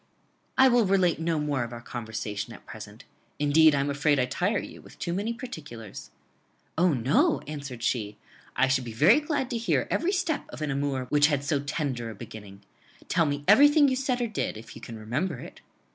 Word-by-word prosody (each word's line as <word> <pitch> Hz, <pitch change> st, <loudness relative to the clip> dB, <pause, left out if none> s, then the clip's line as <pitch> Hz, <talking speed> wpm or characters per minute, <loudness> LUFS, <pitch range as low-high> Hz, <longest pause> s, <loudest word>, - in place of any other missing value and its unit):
"I 265 Hz, -, +7 dB
will 240 Hz, -4 st, +4 dB
relate 185 Hz, -4 st, +2 dB
no 165 Hz, -1 st, 0 dB
more 145 Hz, -4 st, -1 dB
of 120 Hz, -, -7 dB
our 120 Hz, -, -7 dB
conversation 110 Hz, -2 st, -5 dB
at -, -, -14 dB
present; 110 Hz, +2 st, -10 dB, 0.3 s
indeed 150 Hz, +1 st, +5 dB
I 140 Hz, -, +1 dB
am 140 Hz, -, -1 dB
afraid 145 Hz, +1 st, +2 dB
I 125 Hz, -, +2 dB
tire 180 Hz, -, 0 dB
you -, -, -7 dB
with -, -, -16 dB
too 170 Hz, -, -3 dB
many 205 Hz, +5 st, -1 dB
particulars." 145 Hz, -, -8 dB, 0.7 s
"O, 180 Hz, +1 st, +3 dB
no!" 125 Hz, +3 st, +2 dB
answered 140 Hz, -5 st, -7 dB
she; 105 Hz, -5 st, -1 dB, 0.4 s
"I 135 Hz, -, +3 dB
should 135 Hz, -1 st, +1 dB
be 115 Hz, -2 st, -7 dB
glad 260 Hz, -, +3 dB
to 240 Hz, -, -1 dB
hear 225 Hz, -, 0 dB
every 350 Hz, -, +1 dB
step 335 Hz, -6 st, -1 dB
of 155 Hz, -, -7 dB
an 150 Hz, -, -1 dB
amour 135 Hz, -2 st, -1 dB
which 150 Hz, 0 st, +5 dB
had 145 Hz, -3 st, 0 dB
so 145 Hz, 0 st, 0 dB
tender 140 Hz, -5 st, -3 dB
a 110 Hz, -, -8 dB
beginning. 100 Hz, -1 st, -11 dB, 0.5 s
Tell 165 Hz, -3 st, +2 dB
me 145 Hz, 0 st, -2 dB
everything 290 Hz, +6 st, +7 dB
you 260 Hz, -, 0 dB
said 255 Hz, -1 st, -1 dB
or 240 Hz, -, 0 dB
did, 215 Hz, -, -3 dB
if 115 Hz, +1 st, -11 dB
you -, -, -11 dB
can 115 Hz, -, -8 dB
remember 130 Hz, +9 st, -2 dB
it." -, -, -11 dB
145 Hz, 205 wpm, -27 LUFS, 120-195 Hz, 0.7 s, I